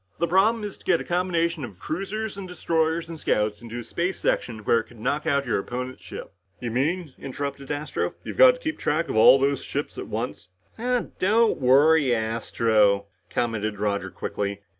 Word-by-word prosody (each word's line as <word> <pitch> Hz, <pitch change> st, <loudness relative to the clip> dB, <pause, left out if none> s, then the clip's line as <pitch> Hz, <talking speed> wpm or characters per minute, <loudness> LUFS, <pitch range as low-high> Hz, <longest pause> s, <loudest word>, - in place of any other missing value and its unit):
The 170 Hz, -, +1 dB
problem 210 Hz, +6 st, +3 dB
is 205 Hz, -2 st, -6 dB
to -, -, -19 dB
get 175 Hz, -3 st, +3 dB
a -, -, -4 dB
combination 170 Hz, -3 st, 0 dB
of 105 Hz, -7 st, -8 dB
cruisers 200 Hz, -, -4 dB
and 195 Hz, -2 st, -7 dB
destroyers 165 Hz, -2 st, 0 dB
and 165 Hz, -1 st, -7 dB
scouts 105 Hz, -4 st, 0 dB
into 120 Hz, 0 st, -7 dB
a 120 Hz, -, -5 dB
space 170 Hz, +10 st, -2 dB
section 110 Hz, -3 st, -1 dB
where 115 Hz, -, +4 dB
it 115 Hz, -, -6 dB
could 120 Hz, -, -17 dB
knock 145 Hz, +7 st, -1 dB
out 140 Hz, -2 st, +2 dB
your 115 Hz, -, 0 dB
opponent's 125 Hz, +5 st, -5 dB
ships." -, -, -9 dB, 0.3 s
"You 120 Hz, -2 st, -4 dB
mean," 150 Hz, +5 st, -1 dB
interrupted 140 Hz, 0 st, -5 dB
Astro, 150 Hz, +1 st, -2 dB
"you've -, -, -6 dB
got -, -, +8 dB
to -, -, -13 dB
keep 315 Hz, -, -3 dB
track 165 Hz, +3 st, 0 dB
of -, -, -2 dB
all 110 Hz, +4 st, +8 dB
those 140 Hz, 0 st, 0 dB
ships -, -, -4 dB
at -, -, -6 dB
once?" -, -, -4 dB, 0.7 s
"Don't 220 Hz, +4 st, +3 dB
worry, 140 Hz, +1 st, +5 dB
Astro," 110 Hz, -2 st, +1 dB, 0.2 s
commented 110 Hz, -3 st, -2 dB
Roger 100 Hz, -1 st, -1 dB
quickly. 100 Hz, 0 st, -4 dB
140 Hz, 185 wpm, -25 LUFS, 115-170 Hz, 0.7 s, got